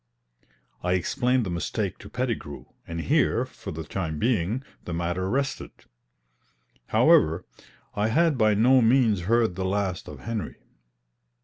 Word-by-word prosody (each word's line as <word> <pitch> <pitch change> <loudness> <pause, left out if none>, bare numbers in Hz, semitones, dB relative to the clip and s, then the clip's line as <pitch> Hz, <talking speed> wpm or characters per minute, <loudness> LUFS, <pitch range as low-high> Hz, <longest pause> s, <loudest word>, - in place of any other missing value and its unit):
I 90 0 0
explained 125 +7 +1
the 90 - -3
mistake 85 -1 -3
to - - -11
Pettigrew, 120 - -4 0.2
and 85 0 -4
here, 135 - +2
for 130 - -9
the 80 0 -5
time 80 -1 -4
being, 115 - 0 0.2
the 85 - -4
matter 85 +2 -2
rested. 135 +4 -2 1.2
However, 80 +3 +4 0.5
I 105 +1 0
had 160 +6 +3
by 110 -4 +3
no 125 +5 +5
means 115 -4 +3
heard 115 -4 +3
the 95 - -3
last 95 -1 -2
of - - -9
Henry. 115 -1 -4
105 Hz, 135 wpm, -26 LUFS, 90-125 Hz, 1.2 s, no